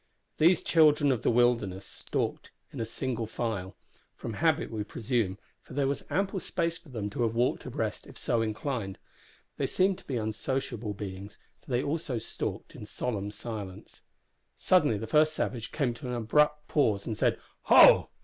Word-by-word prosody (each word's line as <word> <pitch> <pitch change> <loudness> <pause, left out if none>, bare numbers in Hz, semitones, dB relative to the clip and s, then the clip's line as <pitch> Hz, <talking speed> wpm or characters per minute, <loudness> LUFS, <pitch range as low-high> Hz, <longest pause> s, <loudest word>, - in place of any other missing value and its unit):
These 170 +4 +5
children 150 -3 +5
of 125 -5 0
the - - +2
wilderness 115 -6 +2
stalked - - -3 0.2
in - - -3
single 115 -1 -3
file 105 -5 -3 0.4
from 115 - -6
habit 160 +4 +1
we 110 -2 -2
presume, 110 -3 -1 0.2
for - - -12
there 140 -1 +2
was 140 +1 -1
ample 195 0 0
space 170 -2 -1
for 170 - -18
them 110 -5 -4
to 120 - -3
have 115 -1 +1
walked 120 +2 0
abreast - - -3
if - - -11
so 115 - 0
inclined. 110 -2 -3 0.6
They - - 0
seemed 190 0 +2
to - - -20
be 130 - -1
unsociable 110 0 -3
beings, 100 0 -7 0.3
for - - -18
they 125 0 +1
also 145 -3 -2
stalked 115 - -5
in - - -9
solemn 105 -5 -3
silence. 105 -3 -8 0.6
Suddenly 150 - +3
the 110 - -4
first 155 +6 +3
savage 115 -3 -3
came 135 -6 0
to 115 +2 -8
an 125 - -2
abrupt 150 +6 +2
pause, 110 -9 +1
and 110 - -3
said, - - +1 0.3
"Ho!" - - +8
120 Hz, 170 wpm, -29 LUFS, 110-145 Hz, 0.6 s, Ho